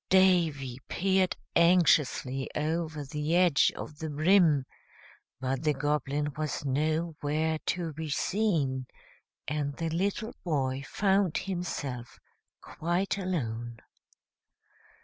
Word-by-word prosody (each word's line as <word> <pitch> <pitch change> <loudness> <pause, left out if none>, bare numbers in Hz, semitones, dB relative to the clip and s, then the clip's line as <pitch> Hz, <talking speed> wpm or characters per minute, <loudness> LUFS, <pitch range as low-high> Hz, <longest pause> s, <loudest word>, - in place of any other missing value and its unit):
Davy 165 -9 +3
peered 190 0 +2 0.2
anxiously 150 -6 +3
over 155 0 -2
the 150 +4 -1
edge 175 -5 +4
of 150 -1 -8
the 160 - -4
brim; 155 -2 +4 0.7
but 130 0 -2
the 150 -2 +1
Goblin 145 +1 -1
was 155 -1 -3
nowhere 155 +2 0
to 170 -3 -1
be 160 +1 -5
seen, 145 - 0 0.6
and 145 -1 -2
the 165 -1 -2
little 200 +7 -1
boy 135 -5 -1
found 195 -4 +2
himself 145 -10 -4 0.4
quite 180 +4 -1
alone. 120 - -3
155 Hz, 100 wpm, -29 LUFS, 140-175 Hz, 0.7 s, edge